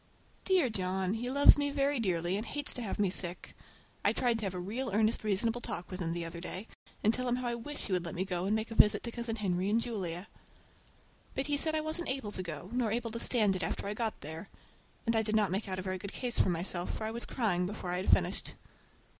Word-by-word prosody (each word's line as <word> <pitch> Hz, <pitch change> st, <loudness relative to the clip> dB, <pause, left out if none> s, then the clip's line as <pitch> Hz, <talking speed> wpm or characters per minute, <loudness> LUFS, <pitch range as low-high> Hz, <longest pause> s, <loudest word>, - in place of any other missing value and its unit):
Dear 370 Hz, -7 st, +4 dB
John! 190 Hz, -1 st, 0 dB
He 240 Hz, +3 st, -2 dB
loves 285 Hz, +2 st, +7 dB
me 285 Hz, 0 st, +1 dB
very 280 Hz, -1 st, +1 dB
dearly, 180 Hz, -4 st, +1 dB
and 210 Hz, -, -1 dB
hates 290 Hz, +5 st, -1 dB
to 250 Hz, -, -4 dB
have 220 Hz, -, -3 dB
me 200 Hz, -3 st, +2 dB
sick. 175 Hz, -1 st, -1 dB, 0.5 s
I -, -, +4 dB
tried 240 Hz, -2 st, +1 dB
to 215 Hz, -, -3 dB
have 185 Hz, -, -4 dB
a -, -, -3 dB
real 230 Hz, +8 st, -3 dB
earnest 215 Hz, +3 st, +2 dB
reasonable 225 Hz, +3 st, 0 dB
talk 180 Hz, -4 st, -5 dB
with 185 Hz, -, -5 dB
him 165 Hz, -2 st, -1 dB
the 170 Hz, 0 st, -2 dB
other 170 Hz, +1 st, -6 dB
day, 185 Hz, +4 st, -5 dB, 0.4 s
and 220 Hz, -, +5 dB
tell 255 Hz, +1 st, -1 dB
him 245 Hz, -, +2 dB
how 250 Hz, 0 st, -2 dB
I -, -, -1 dB
wish 265 Hz, +5 st, -4 dB
he 195 Hz, -, -2 dB
would 180 Hz, -1 st, +1 dB
let 170 Hz, -, -5 dB
me 185 Hz, +2 st, -1 dB
go 180 Hz, -2 st, -1 dB
and 205 Hz, +2 st, +2 dB
make 220 Hz, +1 st, -2 dB
a -, -, -2 dB
visit 210 Hz, -2 st, +6 dB
to 235 Hz, -, -4 dB
Cousin 235 Hz, -1 st, -3 dB
Henry 190 Hz, -3 st, 0 dB
and 220 Hz, +2 st, +3 dB
Julia. 190 Hz, -6 st, -3 dB, 1.1 s
But 270 Hz, -, 0 dB
he 290 Hz, 0 st, +1 dB
said 315 Hz, +2 st, +1 dB
I 310 Hz, -, +1 dB
wasn't 315 Hz, +3 st, -3 dB
able 260 Hz, -6 st, -2 dB
to 185 Hz, -, -2 dB
go, 170 Hz, +2 st, -6 dB
nor 240 Hz, -3 st, +1 dB
able 230 Hz, 0 st, -1 dB
to 230 Hz, -, -4 dB
stand 215 Hz, -6 st, +4 dB
it 185 Hz, -, -2 dB
after 165 Hz, -, -2 dB
I 200 Hz, -, -2 dB
got 220 Hz, 0 st, -2 dB
there; 160 Hz, +6 st, -7 dB, 0.6 s
and 230 Hz, 0 st, +2 dB
I 220 Hz, -, +5 dB
did 215 Hz, 0 st, 0 dB
not 210 Hz, -3 st, +3 dB
make 200 Hz, +3 st, -1 dB
out 185 Hz, -, -2 dB
a 185 Hz, -, -3 dB
very 185 Hz, 0 st, -2 dB
good 200 Hz, +2 st, -6 dB
case 245 Hz, -2 st, 0 dB
for -, -, +4 dB
myself, 175 Hz, +1 st, -1 dB
for -, -, -4 dB
I 220 Hz, -, -1 dB
was 235 Hz, +1 st, -1 dB
crying 180 Hz, -7 st, +1 dB
before 190 Hz, -3 st, -4 dB
I 180 Hz, -, 0 dB
had 185 Hz, -, -2 dB
finished. -, -, +2 dB
215 Hz, 265 wpm, -32 LUFS, 185-240 Hz, 1.1 s, loves